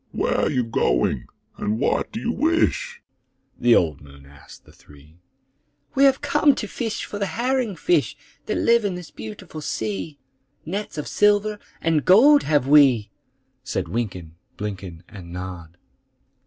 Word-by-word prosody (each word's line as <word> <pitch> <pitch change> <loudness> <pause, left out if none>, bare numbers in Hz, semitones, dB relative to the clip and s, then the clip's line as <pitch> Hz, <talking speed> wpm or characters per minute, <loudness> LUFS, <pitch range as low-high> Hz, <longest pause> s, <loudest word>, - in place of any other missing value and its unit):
"Where - - 0
are - - +1
you 125 - 0
going, 110 - 0 0.3
and 105 +2 -2
what - - 0
do 225 - -5
you 235 0 -1
wish?" 340 - 0 0.6
The 120 -1 +5
old 80 -5 +1
moon 70 -1 -15
asked 70 +2 -16
the - - -18
three. 75 +3 -19 0.7
"We 275 - +4
have 270 -1 +3
come 295 -2 +3
to - - -4
fish 225 -4 -4
for 205 - -7
the 200 - -1
herring 240 +2 -1
fish 345 - +1 0.3
That - - -1
live 235 -1 +3
in 200 -3 -1
this 180 -2 -9
beautiful 110 +8 -9
sea; 110 +2 -4 0.5
Nets 195 +2 -5
of 150 - -4
silver 210 0 +2 0.2
and 160 -3 +1
gold 280 +10 +6
have 145 -4 +1
we," 135 -7 +5 0.5
Said - - -3
Wynken, 95 -8 -4 0.3
Blynken, 95 -5 -6
And 90 -5 -11
Nod. 90 -2 -8
150 Hz, 155 wpm, -23 LUFS, -, 0.7 s, gold